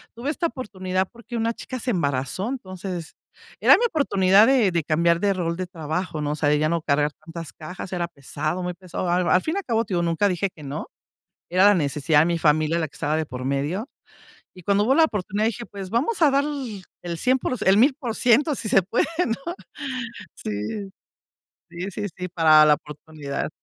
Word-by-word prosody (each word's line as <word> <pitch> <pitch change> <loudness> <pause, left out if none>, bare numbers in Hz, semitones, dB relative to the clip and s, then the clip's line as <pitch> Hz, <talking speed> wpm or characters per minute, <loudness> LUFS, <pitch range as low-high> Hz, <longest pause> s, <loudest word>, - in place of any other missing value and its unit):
tuve 245 +5 -4
esta 335 +1 0
oportunidad 190 - -3
porque 235 0 -10
una 230 +1 0
chica 255 +2 -7
se 250 - -1
embarazó. 140 - -1
Entonces, 185 -8 -6 0.4
era - - +7
mi 475 - +1
oportunidad 205 - +4
de 245 -8 +4
de 170 -2 0
cambiar 170 +2 +2
de 200 0 +2
rol 170 -2 -2
de 185 - -2
trabajo, 160 -1 -4
¿no? 145 0 -1
O - - -1
sea, 145 -1 +1
de 150 - +3
ya 155 0 +2
no 170 -1 0
cargar 145 0 +1
tantas 165 -1 -9
cajas, 180 +4 -8
era 175 -1 -1
pesado, 155 +3 -4
muy 180 0 -2
pesado. 180 0 -5
A 175 - +3 0.2
al 180 - +5
fin 320 - -2
y - - -1
al - - -6
cabo, 230 -2 +1
te 195 - -5
digo, 175 - +2
nunca 170 +4 +2
dije 185 +1 0
que 155 - -12
no. 140 +1 -5 0.6
Era 185 +2 +4
la 205 0 +7
necesidad 150 -1 +2
de 160 - +4
mi 170 -1 0
familia 155 +1 +2
la 160 - 0
que - - -26
estaba 150 +1 -1
de 160 - 0
por 125 -2 -6
medio. 145 - -1 0.7
Y 180 - -13
cuando 200 +3 +2
hubo 265 +4 +3
la 325 - +6
oportunidad 210 - -1
dije: 235 +1 -2
"Pues, 195 -2 -8
vamos 275 - 0
a 295 - +7
dar 280 +1 +2 0.6
el 170 -1 -4
100 255 -4 +1
el 195 - +5
1000 260 +1 +3
si 220 - -3
se 195 - +5
puede 205 +7 0 0.2
¿no? 275 +9 -3 0.8
Sí, 110 - -4 1.0
sí, 205 +2 -4
sí, 180 0 -4
para 160 -3 +6
la 150 - +6
oportunidad. 150 -1 -6
180 Hz, 205 wpm, -24 LUFS, 155-225 Hz, 1.0 s, era